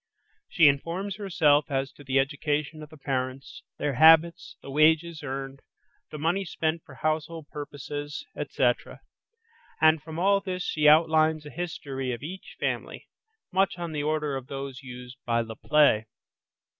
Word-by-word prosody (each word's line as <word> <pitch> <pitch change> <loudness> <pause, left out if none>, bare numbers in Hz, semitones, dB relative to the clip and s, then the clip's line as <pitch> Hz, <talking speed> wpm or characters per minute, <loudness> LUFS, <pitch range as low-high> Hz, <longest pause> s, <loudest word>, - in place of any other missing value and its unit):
She 160 -3 +5
informs 170 +8 0
herself 155 -8 +2
as 135 -1 -1
to 145 - -15
the 135 0 0
education 145 +3 -1
of 150 - -10
the 155 - -14
parents, 130 -1 -4 0.2
their 145 - -1
habits, 160 +5 +5
the 140 - -8
wages 160 +2 +3
earned, 135 0 -5 0.5
the 150 - -7
money 170 +6 0
spent 160 -1 -2
for 130 - -14
household 155 +1 -2
purposes, 145 0 -6
etc., - - -1 0.8
and 160 -1 +5
from 160 +2 -8
all 195 +3 +3
this 185 -2 -4
she 150 -1 +1
outlines 155 0 +4
a 150 - -9
history 140 -7 -4
of 120 - -7
each 185 +5 -8
family, - - -3 0.4
much 190 -1 +1
on 170 -1 -5
the 150 -2 -2
order 150 -1 -1
of 130 -1 -6
those 135 -1 -6
used 125 -1 -10
by 115 -1 +1
Le 115 -1 -7
Play. 140 -6 +3
150 Hz, 155 wpm, -27 LUFS, 135-160 Hz, 0.8 s, She